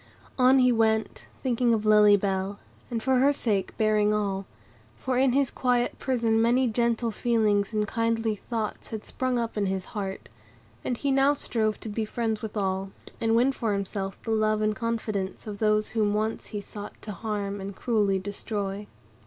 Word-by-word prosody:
On 255 +1 +6
he 250 -1 +5
went, 220 -1 +1 0.2
thinking 245 -2 +2
of 215 -1 -3
Lily 210 -1 +7
Bell, 195 0 -2 0.3
and 230 -3 -3
for 260 -1 +3
her 275 +2 +5
sake 210 -9 -1
bearing 210 -1 +3
all; 195 -2 -2 0.5
for 260 -1 -2
in 265 -2 +3
his 275 -1 +2
quiet 245 -1 0
prison 230 -4 +1
many 245 +3 +3
gentle 235 0 +1
feelings 215 -3 +1
and 210 -1 0
kindly 230 -1 0
thoughts 215 +1 -4
had 220 -2 -6
sprung 255 -1 -1
up 230 -2 -2
in 200 -1 +1
his 190 -1 -2
heart, 195 -2 -4 0.6
and 245 - -2
he 280 +2 0
now 275 +2 +4
strove 220 -6 -1
to 220 - -6
be 220 +2 -2
friends 220 0 -2
with 220 -1 -5
all, 190 -1 -1 0.3
and 225 0 +2
win 250 +4 +4
for 230 -5 -1
himself 195 0 -3
the 225 - -3
love 215 -1 +2
and 215 0 +1
confidence 220 -5 -3
of 205 -2 -6
those 215 -1 +2
whom 210 -2 +1
once 215 +1 -2
he 210 - -4
sought 205 +1 -9
to 215 - -5
harm 205 -1 -3
and 195 0 -6
cruelly 210 -5 +1
destroy. 205 +1 -4
220 Hz, 180 wpm, -27 LUFS, 205-235 Hz, 0.6 s, Lily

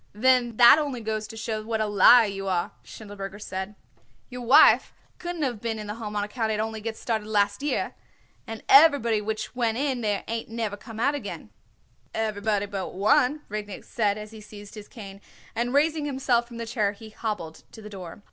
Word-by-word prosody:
"Then 240 +1 +2
that 240 +5 +8
only 285 -5 -3
goes 215 -1 -3
to 225 - -10
show 220 -1 -3
what 220 +1 -3
a 215 - +1
liar 220 +3 +7
you 195 -1 -5
are," 180 -2 -1
Schindelberger 200 -2 -9
said. 190 0 -6 0.6
"Your 250 0 -6
wife 245 +4 +6 0.3
couldn't 350 -3 -4
of 240 -6 -2
been 230 -1 -2
in 215 - -6
the 210 - -5
Home 215 -2 -7
on 205 - 0
account 220 +1 -2
it 215 - -1
only 220 0 -3
gets 225 0 -5
started 220 -3 -2
last 205 0 +1
year, 290 - -1 0.5
and 225 -1 -7
everybody 275 -7 +6
which 215 +2 -4
went 230 -2 0
in 265 -2 -1
there 210 -2 -1
ain't 230 0 -4
never 225 -3 -3
come 220 +2 -11
out 285 +4 0
yet." - - -6 0.7
"Everybody 210 -2 -1
but 200 -2 -5
one," 250 +9 +3
Rudnik 210 -1 -6
said 210 -3 0
as 210 0 -8
he 220 -1 -11
seized 205 -1 -12
his 210 -1 -10
cane, 200 -5 -11 0.3
and 240 +1 -1
raising 300 +2 +2
himself 260 -4 0
from 235 -1 -10
the 230 - -4
chair 215 -3 0
he 215 +1 -13
hobbled 200 -8 -5
to - - -12
the 210 - -10
door. 190 -3 -9
220 Hz, 200 wpm, -26 LUFS, 205-240 Hz, 0.7 s, that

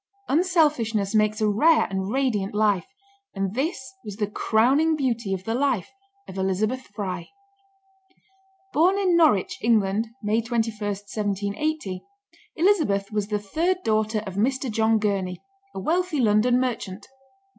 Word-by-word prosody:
Unselfishness 290 - +2
makes 215 0 +2
a 215 - +3
rare 300 +11 +4
and 190 +1 -2
radiant 225 -7 0
life, 205 -5 +2 0.5
and 195 -1 -2
this 275 +7 -1 0.2
was 210 -3 -7
the 210 0 -1
crowning 255 +10 +2
beauty 235 -8 -1
of 190 -1 -2
the 225 - -2
life 255 -6 0 0.4
of 190 - -7
Elizabeth 210 +7 -1
Fry. 185 -5 -4 1.4
Born 355 +6 +4
in 375 -3 +2
Norwich, 310 - +3
England, 220 -1 +2 0.2
May 215 +2 +1
21, 230 -1 -1
1780, 205 +3 -3 0.5
Elizabeth 310 - +2
was 210 -1 -1
the 210 0 -1
third 335 - -1
daughter 215 0 0
of 190 - -6
Mr. 260 +3 0
John 220 +1 +2
Gurney, 195 -4 -1 0.4
a - - -3
wealthy 340 - 0
London 235 +2 +3
merchant. 220 -6 -3
220 Hz, 135 wpm, -24 LUFS, 200-270 Hz, 1.4 s, rare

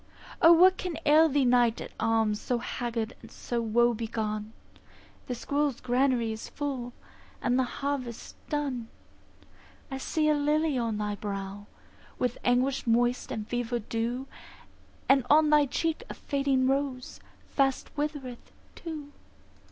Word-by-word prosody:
O, 330 -2 +8
what 365 +3 +7
can 360 -3 -3
ail 310 +2 +6
thee, 280 -1 +2
Knight 245 -2 +3
at - - -7
arms, 225 -2 +1
So 245 - 0
haggard 235 -1 -3
and - - -12
so 240 -1 -3
woe 235 +2 +3
begone? 215 -1 -3 0.8
The 250 - -2
squirrel's 285 +1 -1
granary 250 -2 +1
is 220 0 -6
full, 265 -5 -4 0.5
And 250 +1 +1
the 260 - +3 0.2
harvest's 255 -5 -3 0.2
done. 275 -6 -2 1.0
I 270 - -4
see 305 +3 0
a 305 - +5
lily 300 +1 +1
on 230 -3 -1
thy 210 0 -2
brow, 200 -1 -5 0.5
With 250 -1 -1
anguish 250 +2 +1
moist 240 +2 +2
and 215 -1 -4
fever 245 0 -1
dew; 235 +3 -3 0.8
And 270 -1 +5
on 305 +1 +5
thy 295 -1 +5
cheek 325 +4 -1
a - - -6
fading 275 -2 0
rose 270 -1 -1 0.3
Fast 270 -2 0
withereth 290 -5 -4 0.2
too. 305 -4 -7
250 Hz, 140 wpm, -28 LUFS, 230-285 Hz, 1.0 s, O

